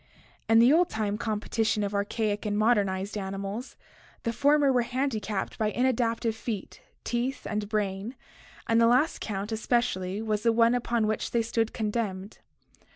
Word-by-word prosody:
In 225 - +6
the 240 +5 +7
old 350 +2 +4
time 210 -2 -1
competi 220 +1 -2
tion 210 -1 +1
of 200 0 -2
archaic 205 +1 -1
and 205 -1 -1
modernized 200 -3 +1
mammals 195 +4 -4
(see - - -14
Chapter - - -25
XXXII) - - -27
the 230 - -1
former 285 +2 +3
were 250 - +3
handicapped 240 -4 -2
by 215 -1 +1
inadaptive 235 -2 +1
feet, 220 -2 -6 0.2
teeth, 245 +3 -2
and 210 -1 -3
brain, 210 +2 -2 0.5
and 230 0 +3
the 230 - +6
last 255 +7 +2
count 205 0 -4
especially 215 -4 0
was 215 -1 -1
the 230 +1 +3
one 230 +1 +4
upon 235 -2 0
which 215 0 -1
they 235 -1 +1
stood 225 0 0
condemned. 210 -3 -3
220 Hz, 170 wpm, -27 LUFS, 205-235 Hz, 0.5 s, the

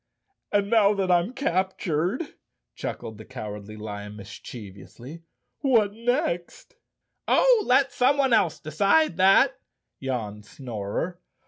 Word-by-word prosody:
"And 205 -1 +2
now 210 -3 +5
that 190 -2 0
I'm 175 +5 +3
cap¬ 190 -8 -1
tured," 180 - -2 0.4
chuckled 110 -1 -6
the - - -8
Cowardly 105 -3 -8
Lion 105 -1 -7
mischievously, 105 - -10 0.4
"what 225 -7 +3
next?" 230 - -2 0.5
"Oh, - - +4
let 270 +1 +4
someone 260 +1 +2
else 195 -8 +2
decide 195 - +2
that," 225 +8 +5 0.4
yawned 110 -6 -4
Snorer. 125 - -5
180 Hz, 110 wpm, -25 LUFS, -, 0.5 s, now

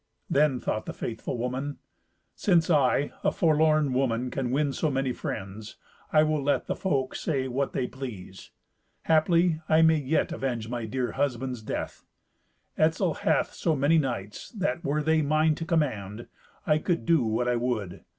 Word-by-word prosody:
Then 140 -3 +3
thought 110 - -3
the - - -5
faithful 115 +1 -4
woman, 130 +4 -3 0.6
"Since 175 -4 +2
I, 145 -1 +3
a - - +3
forlorn 155 -3 +3
woman, 125 -1 0
can 130 -2 -2
win 140 +2 +1
so 155 - 0
many 135 -2 -1
friends, 105 0 -6 0.4
I 155 0 +5
will 155 -1 0
let 140 +1 +1
the - - -2
folk 135 -9 -1
say 135 -5 -1
what 135 +2 -2
they 130 - 0
please. 115 -9 -8 0.5
Haply 165 +1 +3
I 160 +1 +5
may 160 0 +5
yet 145 +3 0
avenge 120 -5 -3
my 120 -2 -3
dear 125 +2 -2
husband's 130 -3 -2
death. 110 - -5 0.8
Etzel 160 +2 +2
hath 155 -1 0
so 165 -3 0
many 150 +4 +3
knights 115 -8 -4
that, 195 -4 -2
were 150 0 0
they 160 +1 +3
mine 155 +2 +2
to 165 - -5
command, 120 - -1 0.4
I 150 0 +3
could 170 +2 -1
do 165 -4 +4
what 115 +1 0
I 125 - +2
would. 115 -7 -3
140 Hz, 165 wpm, -27 LUFS, 125-155 Hz, 0.8 s, I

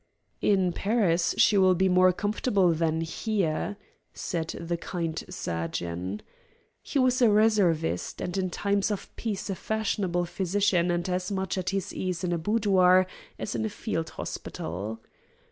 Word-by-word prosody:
"In 190 -4 +2
Paris 190 -6 +1
she 205 -2 +5
will 185 -1 +5
be 190 +2 +2
more 185 0 +5
comfortable 200 -1 +1
than 160 0 0
here," 195 +2 -1 0.4
said 165 -3 -3
the 170 +1 -2
kind 170 -1 -3
surgeon. 85 - -4 0.6
He - - -3
was 255 -1 +3
a 235 - +6
reservist, 200 - +2
and 180 - -3
in 190 -1 0
times 200 +3 0
of 205 -2 -5
peace 215 -4 -3
a - - -2
fashionable 195 -4 -1
physician 185 0 +1
and 175 +1 0
as 180 +1 -2
much 190 -2 -1
at 185 -1 -2
his 195 -1 -2
ease 180 -2 -3
in 175 -1 0
a 170 - -1
boudoir 185 -2 +4 0.3
as - - -4
in - - -1
a 220 - -1
field 165 -6 -3
hospital. 100 +7 -5
185 Hz, 150 wpm, -27 LUFS, 170-205 Hz, 0.6 s, a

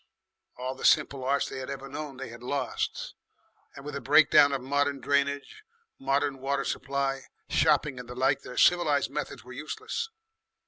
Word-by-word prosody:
All 130 +1 -3
the 135 - -11
simple 140 -3 +3
arts 140 +2 +1
they 135 - -6
had 130 - -6
ever 135 0 -6
known 145 -1 -6
they 135 -1 -6
had 115 0 -11
lost, 140 +3 -3 0.6
and 140 - -10
with 150 - -5
the 140 - -4
breakdown 145 0 +6
of 135 - 0
modern 140 +2 0
drainage, 140 - -1 0.4
modern 135 0 0
water 135 +1 -1
supply, 135 -1 -2 0.2
shopping, 150 -4 +2
and 125 -1 -9
the 125 - -7
like, 135 +2 +2
their 125 - -10
civilised 150 -6 +4
methods 125 - -5
were 125 +1 -11
useless. 435 - -4
140 Hz, 170 wpm, -28 LUFS, 130-145 Hz, 0.6 s, breakdown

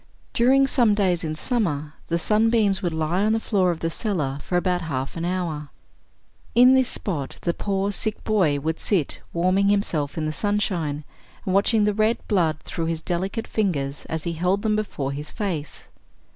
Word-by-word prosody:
During 265 +3 +4
some 240 -6 +3
days 185 -4 +1
in 155 -1 -2
summer, 155 - -1
the 170 - +1
sunbeams 215 +1 +2
would 175 - -1
lie 160 +3 0
on 215 +1 +3
the 225 - +2
floor 195 -5 +1
of 170 -2 -2
the 165 - -1
cellar 155 - -2
for 180 - -1
about 180 0 +1
half 135 -5 -3
an 165 0 -3
hour. 170 -5 -2 0.9
In 250 +2 +7
this 260 -1 +3
spot 150 -9 -3
the 170 - +1
poor 195 +1 -1
sick 215 +1 -2
boy 180 -10 +2
would 160 +3 -2
sit 180 -9 0
warming 185 +3 +2
himself 165 -8 0
in 155 - -1
the 155 - -1
sunshine, 175 -6 -1 0.4
and 185 - 0
watching 210 +2 +3
the 210 0 +2
red 215 +2 +2
blood 165 -7 +1
through 165 -2 -3
his 165 -1 -1
delicate 185 +6 -2
fingers 145 -10 -1
as 160 -1 -4
he 170 - -2
held 180 +5 0
them 215 -1 +2
before 150 -10 -2
his 145 +2 -5
face. 180 -9 -4
180 Hz, 185 wpm, -24 LUFS, 160-210 Hz, 0.9 s, In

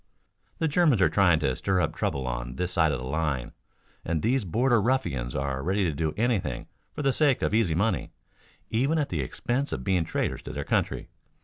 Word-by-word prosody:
The 160 - +1
Germans 150 - +3
are 95 - +4
trying 90 -5 +4
to 65 -3 +1
stir 95 -2 0
up - - 0
trouble 70 -2 -2
on - - -4
this 90 +5 -2
side 80 -4 +3
of 70 - -1
the 65 - -6
line, 70 -3 -1 0.5
and 80 -1 -1
these 125 0 +1
border 120 +5 +2
ruffians 85 - 0
are 70 -1 -2
ready 95 +6 0
to 85 - +1
do 80 +1 -1
anything 115 -3 0 0.3
for 150 - -5
the 135 -1 +3
sake 145 -3 +2
of - - 0
easy 105 -8 +2
money, 100 -1 0 0.6
even 135 +8 +2
at 150 -2 0
the 80 -5 -1
expense 120 - -2
of 65 - -3
being 90 0 +2
traitors - - -2
to - - -8
their - - -3
country. - - -1
90 Hz, 205 wpm, -27 LUFS, -, 0.6 s, are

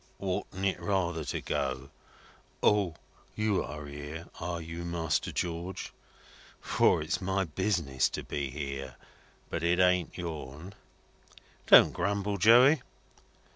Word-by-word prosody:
"Oughtn't 95 0 -3
it 95 -2 0
rather 85 -2 -1
to 70 - -3
go, 65 0 -3 0.7
'O! 100 -6 +3 0.4
You're 95 -8 -1
here, 75 +3 -7
are 85 0 -3
you, 85 +1 -6
Master 80 -3 -1
George?' 85 +2 -4 0.7
For - - +2
it's 90 +4 -2
my 95 +1 0
business 85 -6 0
to - - -5
be 70 -2 -3
here. 70 -2 -5 0.6
But 80 - -2
it 85 +1 +2
ain't 90 -2 +2
yourn." 80 0 -6 0.9
"Don't - - +8
grumble, 100 0 -1
Joey." 125 - +7
85 Hz, 115 wpm, -30 LUFS, 75-95 Hz, 0.9 s, Don't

